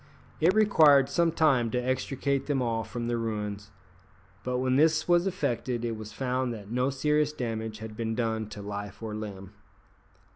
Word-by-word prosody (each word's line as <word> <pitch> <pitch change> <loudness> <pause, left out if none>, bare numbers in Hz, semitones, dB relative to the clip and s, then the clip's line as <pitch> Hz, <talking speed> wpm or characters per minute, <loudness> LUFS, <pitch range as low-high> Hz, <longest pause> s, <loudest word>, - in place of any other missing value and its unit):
It 175 +5 +4
required 155 -11 +6
some 170 +3 +2
time 135 -8 +3
to 125 - -2
extricate 130 +2 -1
them 145 -2 +1
all 115 -2 -1
from 120 +1 -5
the 120 0 -1
ruins, 105 -3 -4 0.7
but 125 0 -1
when 130 0 +1
this 155 +2 +3
was 175 +1 +4
effected 125 - -2
it 115 -1 -2
was 110 0 -8
found 130 +1 -1
that 105 -1 -10
no 125 +2 +1
serious 150 +2 +1
damage 110 -6 -4
had 110 -1 -8
been 115 0 -2
done 110 -2 -1
to 105 -1 -8
life 100 +1 -6
or 110 -1 -4
limb. 100 -2 -7
120 Hz, 175 wpm, -28 LUFS, 110-140 Hz, 0.7 s, required